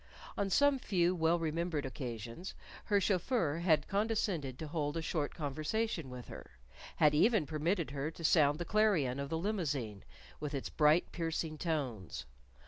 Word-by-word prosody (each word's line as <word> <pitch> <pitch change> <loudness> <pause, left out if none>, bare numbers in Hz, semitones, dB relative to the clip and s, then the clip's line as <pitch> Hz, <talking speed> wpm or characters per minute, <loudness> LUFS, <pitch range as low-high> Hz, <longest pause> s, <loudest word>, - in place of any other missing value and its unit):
On 200 -1 0
some 285 +5 +4
few 180 -6 +2
well 165 -1 +2
remembered 165 -2 -1
occasions 120 - -6 0.3
her 205 -2 +3
chauffeur 185 - +1
had 160 -4 +3
condescended 195 - 0
to 160 - -6
hold 150 0 -2
a - - -1
short 155 -2 -2
conversation 155 +3 -2
with 125 -1 -8
her; - - -11 0.4
had 150 -1 +5
even 205 +3 +4
permitted 160 +2 -1
her 140 +1 -2
to 165 +1 -10
sound 150 -2 +4
the 175 - -4
clarion 180 -13 +2
of 140 0 -3
the 160 - -1
limousine, 145 - -2 0.4
with 150 -1 -4
its 135 - -3
bright, 155 +2 +4
piercing 165 -1 -2
tones. 120 - -3
160 Hz, 155 wpm, -34 LUFS, 140-180 Hz, 0.4 s, had